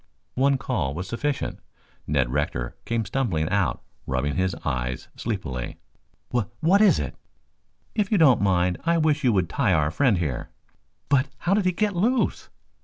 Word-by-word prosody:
One 135 +1 +3
call 70 - -2
was 90 +3 -4
sufficient. 140 +5 -2 0.5
Ned 70 -4 +1
Rector 65 -4 -2
came 115 -1 -1
stumbling 100 - -1
out, 100 -4 0 0.2
rubbing 65 +2 -1
his 95 0 0
eyes 65 0 -2
sleepily. 70 - -4 0.5
"Wha 120 -4 +1
what 185 +6 +4
is 200 -7 +6
it?" 70 -4 -3 0.8
"If 210 -2 0
you 210 - +4
don't 135 - +5
mind, 90 -2 +2
I 170 0 +2
wish 155 -2 +2
you 125 - +4
would 95 -4 +2
tie 110 0 +1
our 75 -2 +2
friend 120 - +3
here 75 -8 -3 0.3
" - - -45
"But, 140 0 +3
how 180 - 0
did 200 -1 +2
he 185 - +4
get 205 +2 0
loose?" 235 +8 +1
110 Hz, 170 wpm, -25 LUFS, -, 0.8 s, is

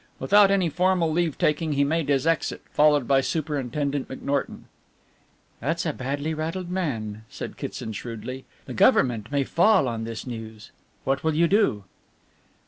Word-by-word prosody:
Without 205 -1 +5
any 195 -3 +2
formal 180 0 +1
leave 165 -2 0
taking 150 +1 +1
he 140 0 +2
made 155 +1 0
his 135 -1 +2
exit, 165 -1 0
followed 150 -3 +4
by 135 -1 +4
Superintendent 145 -2 -2
McNorton. 140 +1 -3 1.0
"That's 165 +8 -2
a 155 - 0
badly 145 +5 -3
rattled 165 +3 -4
man," 110 - -3
said - - -7
Kitson 110 - -6
shrewdly, 120 +4 -7 0.2
"the - - -7
Government 115 -3 +3
may 140 -1 +1
fall 185 +1 +3
on 115 -2 -3
this 115 0 -6
news. 110 -3 -8 0.3
What 135 +1 -1
will 160 -1 +1
you 170 +2 +4
do?" 195 - +2
145 Hz, 150 wpm, -25 LUFS, 130-165 Hz, 1.0 s, Without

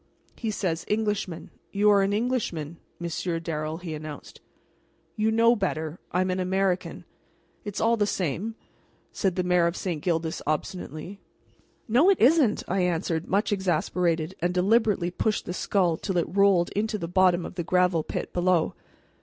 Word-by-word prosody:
"And - - -25
he 225 - -2
says 180 -5 -2
'Englishman.' 210 -5 -2 0.2
You 210 +1 +4
are 200 -1 +5
an 195 +1 +1
Englishman, 205 - -2 0.2
Monsieur 170 0 -2
Darrel," 155 -1 -3
he 170 -2 -6
announced. 155 -1 -8 0.7
"You 220 0 +1
know 230 +2 +4
better. 190 -7 -1
You 155 - -5
know 165 - -13 0.2
I'm 185 0 +1
an 185 - -1
American." 185 0 -1 0.6
"It's 205 -2 -5
all 230 +1 +3
the 205 -1 +2
same," 190 +5 -2 0.6
said 190 -4 -1
the 185 - 0
Mayor 180 -1 +3
of 170 - -3
St. 170 -6 -3
Gildas, 165 -1 -1
obstinately. 155 +4 -4 0.7
"No, 255 - +5
it 390 - +3
isn't!" 265 -2 +4
I 190 - 0
answered, 170 -1 -1
much 205 +3 +1
exasperated, 175 -3 0
and 175 +1 -1
deliberately 195 -2 +2
pushed 215 +3 -1
the 180 - -4
skull 180 -3 +1
till 190 -3 -2
it 170 +1 -1
rolled 195 -3 +4
into 215 +1 -1
the 170 - -4
bottom 180 -1 +3
of - - -7
the 175 -1 -3
gravel 180 -1 +2
pit - - -5
below. 175 -2 +2
185 Hz, 170 wpm, -26 LUFS, 170-205 Hz, 0.7 s, are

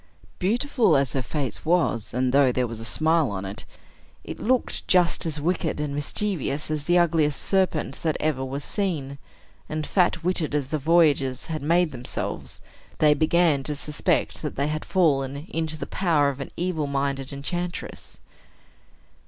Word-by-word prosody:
Beautiful 225 - +2
as 135 -3 0
her 135 - 0
face 130 -2 -3
was, 160 - +1
and 125 +1 0
though 140 -2 +5
there 125 0 0
was 115 -1 -6
a - - -7
smile 155 +4 +2
on 100 -1 -4
it, 100 +4 -5 0.6
it - - -7
looked 255 +2 0
just 175 -2 +3
as 155 -1 -2
wicked 165 0 -1
and 150 -1 -2
mischievous 150 -1 -1
as 150 -2 -2
the 175 0 +3
ugliest 160 -4 +2
serpent 185 -7 0
that 160 -2 0
ever 150 -4 0
was 135 +2 -4
seen; 150 -9 -2 0.5
and 155 0 -3
fat 175 -1 +1
witted 170 -4 0
as 140 -3 -1
the 155 - -1
voyagers 145 -4 +3
had 155 - -3
made 170 +2 +2
themselves, 125 -2 -4 0.4
they 150 -1 +5
began 160 -1 +3
to 150 +2 -3
suspect 150 +1 -1
that - - -4
they 140 +2 0
had 155 0 -3
fallen 140 -5 +1
into 160 -1 -1
the - - -5
power 160 -7 +2
of 140 -1 -6
an 140 - -5
evil 170 -4 -1
minded 140 -1 -2
enchantress. 175 +6 -5
150 Hz, 165 wpm, -25 LUFS, 140-170 Hz, 0.6 s, though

